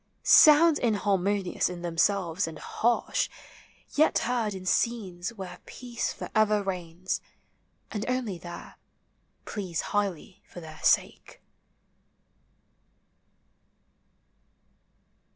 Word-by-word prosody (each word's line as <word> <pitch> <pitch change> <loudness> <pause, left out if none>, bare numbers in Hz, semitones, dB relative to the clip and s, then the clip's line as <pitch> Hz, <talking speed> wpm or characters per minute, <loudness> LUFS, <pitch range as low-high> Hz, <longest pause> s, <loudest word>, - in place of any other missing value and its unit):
Sounds 310 +1 +7
inharmonious 200 -5 0
in 175 -1 -7
themselves 175 +1 0
and 165 - -7
harsh, 235 +1 0 0.6
Yet 310 +2 +3
heard 230 -4 -1
in 185 -1 -8
scenes 190 -3 -1
where 180 -3 -8
peace 240 -1 -4
for - - -8
ever 215 -1 +3
reigns 180 -1 -4 0.7
And 210 -1 -3
only 240 -8 -2
there, 175 +1 -10 0.7
please 185 -6 -3
highly 195 -3 -2
for - - -9
their 155 -2 -11
sake. - - +1
200 Hz, 90 wpm, -27 LUFS, 175-225 Hz, 0.7 s, Sounds